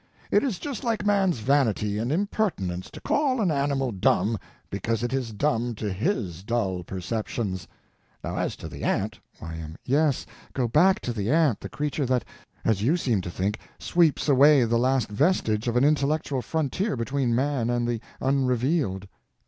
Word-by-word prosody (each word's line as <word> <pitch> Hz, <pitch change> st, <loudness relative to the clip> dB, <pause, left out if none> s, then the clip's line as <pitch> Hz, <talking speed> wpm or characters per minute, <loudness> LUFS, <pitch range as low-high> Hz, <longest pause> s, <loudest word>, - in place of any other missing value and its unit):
It -, -, +5 dB
is 250 Hz, -10 st, -1 dB
just 275 Hz, +5 st, -5 dB
like 225 Hz, -4 st, -1 dB
man's 195 Hz, -5 st, +3 dB
vanity 110 Hz, -6 st, +1 dB
and 120 Hz, +4 st, -1 dB
impertinence 160 Hz, -, -1 dB
to -, -, -10 dB
call 275 Hz, -4 st, +1 dB
an 195 Hz, -6 st, +2 dB
animal 140 Hz, -3 st, 0 dB
dumb 105 Hz, +2 st, +1 dB, 0.3 s
because 115 Hz, +3 st, -1 dB
it 120 Hz, +1 st, -1 dB
is 130 Hz, -3 st, -1 dB
dumb 120 Hz, 0 st, 0 dB
to 105 Hz, -2 st, -3 dB
his 95 Hz, -, -2 dB
dull 100 Hz, -4 st, -1 dB
perceptions. 95 Hz, +1 st, -3 dB, 0.6 s
Now -, -, -3 dB
as -, -, -1 dB
to -, -, -8 dB
the -, -, -8 dB
ant— -, -, -1 dB, 0.2 s
Y.M. 80 Hz, -1 st, -7 dB
Yes, 145 Hz, +1 st, +2 dB, 0.3 s
go 125 Hz, -2 st, 0 dB
back 185 Hz, -, +4 dB
to 120 Hz, -, -3 dB
the 105 Hz, -1 st, -2 dB
ant, 150 Hz, -7 st, +3 dB
the -, -, -7 dB
creature 145 Hz, -2 st, -2 dB
that—as 115 Hz, -4 st, -2 dB
you 145 Hz, +11 st, +3 dB
seem 120 Hz, -, +1 dB
to 90 Hz, -, -6 dB
think—sweeps 110 Hz, -, 0 dB
away 140 Hz, 0 st, +6 dB
the 115 Hz, +1 st, +2 dB
last 130 Hz, -2 st, +2 dB
vestige 110 Hz, -, +1 dB
of 120 Hz, -, 0 dB
an 125 Hz, -, +4 dB
intellectual 145 Hz, -2 st, +1 dB
frontier 160 Hz, -, -1 dB
between 125 Hz, 0 st, 0 dB
man 130 Hz, -2 st, 0 dB
and 120 Hz, -1 st, 0 dB
the 120 Hz, -2 st, -2 dB, 0.2 s
Unrevealed. 130 Hz, -, +1 dB
125 Hz, 165 wpm, -26 LUFS, 110-150 Hz, 0.6 s, away